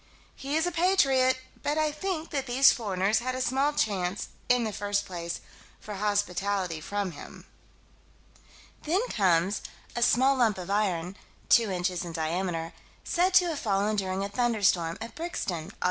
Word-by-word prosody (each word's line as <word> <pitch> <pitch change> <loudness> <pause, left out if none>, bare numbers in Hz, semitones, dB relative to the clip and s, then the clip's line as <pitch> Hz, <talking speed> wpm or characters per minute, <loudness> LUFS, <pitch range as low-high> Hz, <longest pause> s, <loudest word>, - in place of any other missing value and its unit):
He 275 +2 -4
is 320 +1 +2
a 355 - 0
patriot, 275 -8 +3 0.2
but 295 +1 -1
I 310 -1 +2
think 325 +1 -4
that 275 -3 -2
these 260 +3 +6
foreigners 200 -2 0
had 255 +1 -3
a - - -3
small 265 +3 +1
chance 200 -8 -1 0.2
"in 245 -1 +4
the 215 -2 -3
first 205 0 -1
place" 170 -2 -5 0.4
for 210 - -8
hospitality 200 -4 -1
from 200 +2 -3
him. 150 - -11 1.4
Then 375 +10 0
comes 185 -1 +2 0.3
a 240 - -2
"small 260 +3 +4
lump 225 -5 +2
of 185 +1 -6
iron 190 -3 0 0.3
(two 230 -3 +5
inches 180 -1 -1
in 170 -1 -7
diameter)" 165 +1 -2 0.3
said 360 +2 +1
to 360 - +7
have 310 -4 -3
fallen, 205 0 0
during 190 -1 -1
a - - -2
thunderstorm, 200 -8 +1
at 230 +1 -7
Brixton, 195 - -4
Aug. - - -13
210 Hz, 160 wpm, -28 LUFS, 185-270 Hz, 1.4 s, to